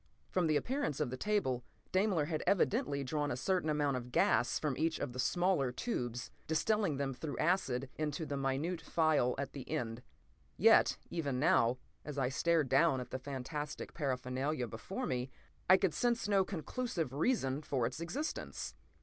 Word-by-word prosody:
From 180 Hz, -3 st, +2 dB
the 155 Hz, -, +2 dB
appearance 255 Hz, -, -1 dB
of 120 Hz, -, 0 dB
the -, -, -2 dB
table, 130 Hz, -8 st, 0 dB, 0.3 s
Daimler 185 Hz, -5 st, +2 dB
had 155 Hz, 0 st, -2 dB
evidently 140 Hz, -5 st, +2 dB
drawn 145 Hz, +2 st, -1 dB
a 120 Hz, -, -2 dB
certain 180 Hz, +3 st, 0 dB
amount 145 Hz, -3 st, +1 dB
of 125 Hz, 0 st, -7 dB
gas 120 Hz, +1 st, +3 dB
from 150 Hz, -4 st, -1 dB
each 160 Hz, +3 st, 0 dB
of 120 Hz, -, -4 dB
the 125 Hz, -, -7 dB
smaller 175 Hz, -3 st, +2 dB
tubes, 125 Hz, -, -3 dB, 0.2 s
distilling 180 Hz, 0 st, +1 dB
them 135 Hz, -1 st, -1 dB
through 145 Hz, +1 st, -5 dB
acid 140 Hz, -7 st, +1 dB
into 155 Hz, +1 st, -1 dB
the 145 Hz, -, -3 dB
minute 140 Hz, +6 st, -1 dB
phial 155 Hz, -6 st, +2 dB
at 140 Hz, 0 st, -4 dB
the 135 Hz, -3 st, -8 dB
end. 120 Hz, -6 st, -2 dB, 0.6 s
Yet -, -, +6 dB
even 140 Hz, -7 st, -1 dB
now, 130 Hz, -6 st, +4 dB, 0.3 s
as 150 Hz, -2 st, -6 dB
I 130 Hz, -2 st, +1 dB
stared 160 Hz, +2 st, +2 dB
down 135 Hz, +1 st, +4 dB
at 125 Hz, -1 st, -7 dB
the 130 Hz, -, -3 dB
fantastic 140 Hz, +2 st, -5 dB
paraphernalia 130 Hz, -1 st, -1 dB
before 155 Hz, -, -5 dB
me, 125 Hz, -, -2 dB, 0.4 s
I 185 Hz, -, +9 dB
could 190 Hz, -4 st, +1 dB
sense 240 Hz, -3 st, +1 dB
no 200 Hz, -2 st, +4 dB
conclusive 180 Hz, -, -3 dB
reason 145 Hz, -, +1 dB
for 135 Hz, -5 st, 0 dB
its 125 Hz, +5 st, -3 dB
existence. 245 Hz, -, -4 dB
145 Hz, 170 wpm, -34 LUFS, 130-170 Hz, 0.6 s, I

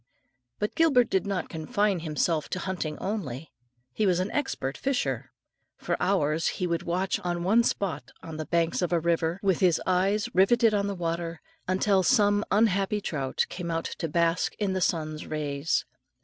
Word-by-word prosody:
But 210 Hz, -, -2 dB
Gilbert 275 Hz, -8 st, +3 dB
did 190 Hz, 0 st, +1 dB
not 190 Hz, -4 st, -2 dB
confine 190 Hz, +4 st, 0 dB
himself 155 Hz, -1 st, -1 dB
to 185 Hz, -, -3 dB
hunting 175 Hz, -5 st, -3 dB
only; 165 Hz, -, -4 dB, 0.4 s
he 210 Hz, -, +1 dB
was 180 Hz, -1 st, +2 dB
an 185 Hz, +3 st, -1 dB
expert 145 Hz, -, -2 dB
fisher. 270 Hz, -2 st, -2 dB, 0.5 s
For -, -, -2 dB
hours 160 Hz, -4 st, +1 dB
he 180 Hz, -, -1 dB
would 170 Hz, -1 st, -1 dB
watch 185 Hz, +3 st, -1 dB
at 175 Hz, -1 st, -1 dB
one 205 Hz, +7 st, +3 dB
spot 185 Hz, -, -2 dB
on 160 Hz, -1 st, -7 dB
the 155 Hz, -, -5 dB
banks 170 Hz, 0 st, +1 dB
of 180 Hz, -, 0 dB
a 170 Hz, -, +3 dB
river, 165 Hz, +1 st, 0 dB
with 190 Hz, -4 st, +2 dB
his 180 Hz, -3 st, +3 dB
eyes 195 Hz, +4 st, +1 dB
riveted 225 Hz, +4 st, +4 dB
on 200 Hz, -1 st, +1 dB
the 200 Hz, -, -3 dB
water, 165 Hz, -1 st, -3 dB, 0.3 s
until 190 Hz, +1 st, +2 dB
some 205 Hz, -1 st, +3 dB
unhappy 205 Hz, -1 st, +2 dB
trout 140 Hz, -9 st, -1 dB
came 175 Hz, -2 st, -5 dB
out 165 Hz, 0 st, -2 dB
to 165 Hz, -, -1 dB
bask 170 Hz, +2 st, +1 dB
in 200 Hz, -3 st, -1 dB
the 185 Hz, -, -1 dB
sun's 155 Hz, -4 st, -1 dB
rays. 150 Hz, 0 st, -1 dB
180 Hz, 175 wpm, -27 LUFS, 165-200 Hz, 0.5 s, riveted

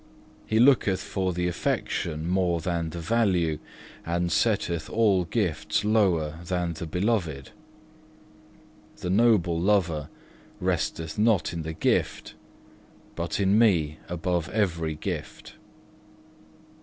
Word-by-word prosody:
He 110 Hz, -, +1 dB
looketh 120 Hz, -7 st, +4 dB
for 95 Hz, -2 st, -2 dB
the 90 Hz, 0 st, -1 dB
affection 80 Hz, -2 st, -2 dB
more 90 Hz, -2 st, +1 dB
than 85 Hz, 0 st, -2 dB
the 85 Hz, -, -7 dB
value, 90 Hz, -6 st, +1 dB, 0.4 s
and 85 Hz, +1 st, -1 dB
setteth 85 Hz, -4 st, 0 dB
all 100 Hz, -5 st, +2 dB
gifts 90 Hz, 0 st, -1 dB
lower 90 Hz, -8 st, +2 dB
than 90 Hz, -1 st, -2 dB
the 85 Hz, +1 st, -6 dB
Beloved. 90 Hz, -, -1 dB, 1.5 s
The 90 Hz, -, -3 dB
noble 95 Hz, -6 st, +3 dB
lover 85 Hz, -7 st, +1 dB, 0.5 s
resteth 80 Hz, +2 st, -2 dB
not 105 Hz, -6 st, +2 dB
in 85 Hz, -, -3 dB
the 80 Hz, 0 st, -5 dB
gift, 80 Hz, -, -1 dB, 0.8 s
but 85 Hz, 0 st, -3 dB
in 100 Hz, +2 st, +3 dB
Me 80 Hz, -9 st, +2 dB
above 85 Hz, -1 st, -1 dB
every 85 Hz, -6 st, -1 dB
gift. 75 Hz, -, -6 dB
90 Hz, 110 wpm, -26 LUFS, 80-100 Hz, 1.5 s, looketh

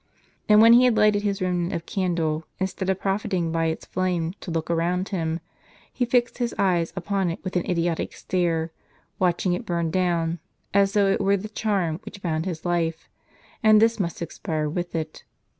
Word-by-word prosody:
And 210 Hz, 0 st, +7 dB
when 230 Hz, +1 st, +8 dB
he 245 Hz, +2 st, +7 dB
had 240 Hz, -3 st, +3 dB
lighted 210 Hz, -1 st, +4 dB
his 200 Hz, -2 st, -1 dB
remnant 180 Hz, -1 st, -1 dB
of 165 Hz, -, -4 dB
candle, 165 Hz, -5 st, -1 dB
instead 190 Hz, 0 st, -2 dB
of 190 Hz, 0 st, 0 dB
profiting 195 Hz, -4 st, -1 dB
by 165 Hz, 0 st, 0 dB
its 160 Hz, -, -3 dB
flame 175 Hz, -2 st, -1 dB
to -, -, -8 dB
look 165 Hz, -1 st, -2 dB
around 175 Hz, +3 st, 0 dB
him, 165 Hz, -4 st, -2 dB, 0.5 s
he 245 Hz, -, 0 dB
fixed 240 Hz, 0 st, +1 dB
his 240 Hz, -1 st, -1 dB
eyes 175 Hz, -4 st, +1 dB
upon 190 Hz, 0 st, -1 dB
it 165 Hz, -, -3 dB
with 185 Hz, -1 st, -5 dB
an 180 Hz, +2 st, 0 dB
idiotic 170 Hz, -2 st, -1 dB
stare, 170 Hz, -3 st, -1 dB, 0.5 s
watching 180 Hz, 0 st, +1 dB
it 210 Hz, -, -3 dB
burn 170 Hz, -5 st, -1 dB
down, 170 Hz, -2 st, 0 dB, 0.3 s
as 200 Hz, 0 st, +3 dB
though 205 Hz, -1 st, +4 dB
it -, -, 0 dB
were 200 Hz, 0 st, +3 dB
the 210 Hz, +3 st, -7 dB
charm 195 Hz, -7 st, -1 dB
which 200 Hz, -, -10 dB
bound 160 Hz, 0 st, -1 dB
his 170 Hz, -3 st, -5 dB
life, 165 Hz, -2 st, -1 dB, 0.5 s
and 215 Hz, -2 st, +6 dB
this 225 Hz, +1 st, +3 dB
must 170 Hz, -2 st, -2 dB
expire 160 Hz, -3 st, -3 dB
with 175 Hz, +3 st, -4 dB
it. 155 Hz, -1 st, -4 dB
180 Hz, 190 wpm, -24 LUFS, 165-200 Hz, 0.5 s, when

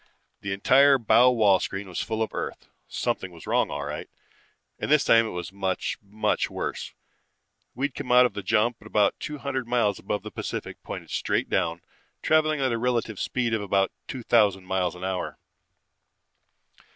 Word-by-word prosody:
The 100 Hz, -, -5 dB
entire 135 Hz, +8 st, +5 dB
bow 125 Hz, +1 st, +5 dB
wall 105 Hz, -6 st, +4 dB
screen 95 Hz, 0 st, -4 dB
was 90 Hz, -, -5 dB
full 110 Hz, 0 st, -1 dB
of 110 Hz, -, -5 dB
Earth. -, -, -5 dB, 0.2 s
Something 95 Hz, -, -2 dB
was 85 Hz, -2 st, -13 dB
wrong -, -, +1 dB
all 70 Hz, -, -4 dB
right, 75 Hz, 0 st, -6 dB, 0.7 s
and -, -, -3 dB
this 150 Hz, -1 st, +5 dB
time 115 Hz, 0 st, +5 dB
it -, -, -4 dB
was 90 Hz, +2 st, -6 dB
much, 95 Hz, -1 st, -2 dB
much 105 Hz, +1 st, -1 dB
worse. -, -, -5 dB, 0.8 s
We'd 135 Hz, +2 st, -1 dB
come 130 Hz, -2 st, -5 dB
out 125 Hz, 0 st, +7 dB
of 125 Hz, -, -1 dB
the 100 Hz, -, -4 dB
jump 110 Hz, +4 st, +1 dB
about 105 Hz, -1 st, +1 dB
two 150 Hz, -, -5 dB
hundred 130 Hz, -1 st, -3 dB
miles 120 Hz, -4 st, +1 dB
above 105 Hz, -, -3 dB
the -, -, -7 dB
Pacific, -, -, -5 dB
pointed -, -, -8 dB
straight -, -, -1 dB
down, 85 Hz, +1 st, 0 dB, 0.4 s
traveling 155 Hz, -1 st, +3 dB
at 130 Hz, -2 st, +1 dB
a 115 Hz, -, -1 dB
relative 115 Hz, -4 st, -1 dB
speed 120 Hz, -3 st, -1 dB
of 110 Hz, -, 0 dB
about 100 Hz, -1 st, +1 dB, 0.2 s
two 130 Hz, -3 st, -6 dB
thousand 100 Hz, -5 st, +3 dB
miles 90 Hz, -2 st, -1 dB
an 90 Hz, -, -10 dB
hour. 95 Hz, -1 st, -3 dB
110 Hz, 175 wpm, -26 LUFS, 95-125 Hz, 0.8 s, out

